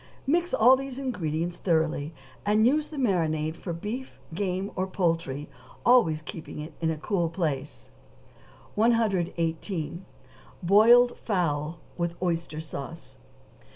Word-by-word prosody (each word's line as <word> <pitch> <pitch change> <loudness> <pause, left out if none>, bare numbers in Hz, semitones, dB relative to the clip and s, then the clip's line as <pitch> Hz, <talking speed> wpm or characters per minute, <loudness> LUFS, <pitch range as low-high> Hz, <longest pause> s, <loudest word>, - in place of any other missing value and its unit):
Mix 345 +5 +1
all 245 +4 +6
these 270 -1 -5
ingredients 175 - -2
thoroughly, 160 -3 0 0.3
and 210 +2 +3
use 300 +4 +3
the 305 - -9
marinade 160 - +1
for 175 - -6
beef, 215 +10 -5
game, 190 +2 -2
or 185 +1 -1
poultry, 165 -6 -1 0.4
always 215 -11 +4
keeping 155 +1 -8
it 150 +2 -7
in 165 - +1
a 160 - -1
cool 170 +1 0
place. 150 -5 -3 0.8
118. 180 -6 0 0.6
=Boiled 230 +6 +6
Fowl 165 -6 -1 0.2
with 170 0 -1
Oyster 170 -3 -2
Sauce. 160 +1 -8
175 Hz, 120 wpm, -27 LUFS, 160-220 Hz, 0.8 s, all